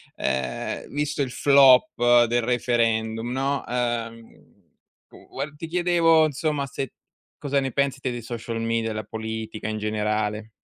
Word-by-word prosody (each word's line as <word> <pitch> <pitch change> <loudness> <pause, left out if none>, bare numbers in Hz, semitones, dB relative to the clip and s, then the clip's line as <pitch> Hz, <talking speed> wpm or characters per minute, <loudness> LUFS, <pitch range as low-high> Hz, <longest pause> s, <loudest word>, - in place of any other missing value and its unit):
ehm, 65 -1 -3
visto 145 0 -2
il 130 -3 -1
flop 125 -3 +5
del 120 +1 +1
referendum, 115 -1 0
no, 135 +2 -1
ehm, 115 -2 -4 0.6
tu - - -17
v 140 +2 -5
ti 165 +2 -7
chiedevo, 170 -2 +3
insomma, 150 -1 -1
se 135 -1 -5 0.5
cosa 140 -1 0
ne 135 -1 -2
pensi 140 +1 -1
te 130 - -2
dei 120 -1 -5
social 115 0 -5
media, 115 0 -1
della 110 0 -4
politica, 110 0 -5
in 110 - -3
generale. 105 0 -2
120 Hz, 140 wpm, -24 LUFS, 110-140 Hz, 0.6 s, flop